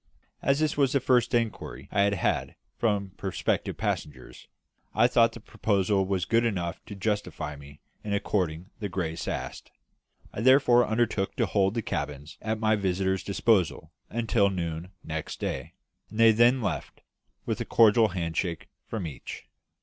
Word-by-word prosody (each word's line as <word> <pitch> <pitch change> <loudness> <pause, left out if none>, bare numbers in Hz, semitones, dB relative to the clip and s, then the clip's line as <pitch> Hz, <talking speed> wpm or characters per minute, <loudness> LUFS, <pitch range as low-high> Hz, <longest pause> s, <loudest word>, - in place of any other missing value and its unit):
As 140 +2 +2
this 155 -1 +1
was 135 -3 +2
the 140 - +4
first 125 -2 +2
inquiry 105 - -2
I 100 - +2
had 100 0 +3
had 95 - -1 0.2
from 100 -4 0
prospective 95 -2 -2
passengers, 75 - -4 0.5
I 110 - +5
thought 120 -2 +4
the - - -9
proposal 100 -3 0
was 95 -2 0
good 115 +1 +2
enough 90 -7 -2
to 105 - -8
justify 105 -7 -2
me 70 +1 -14 0.2
in 105 - -4
according 90 -3 -1
the 105 -3 -3
grace 85 -3 -3
asked. - - -5 0.6
I - - -4
therefore 125 -1 +5
undertook 110 -3 0
to - - +2
hold 100 +1 +1
the 115 - -1
cabins 75 -2 -5
at 110 0 -1
my 110 0 +3
visitors' 95 -1 0
disposal 100 -3 +1 0.2
until 115 -3 +2
noon 85 -2 -4
next 80 -1 -5
day; - - -4 0.3
and 110 - -8
they 115 0 +8
then 120 +3 +4
left, - - -4 0.4
with - - -2
a - - -2
cordial 115 0 +5
hand 85 -4 -3
shake 85 -2 -2 0.2
from 110 -6 -4
each. 75 -5 -8
100 Hz, 160 wpm, -27 LUFS, 90-115 Hz, 0.6 s, they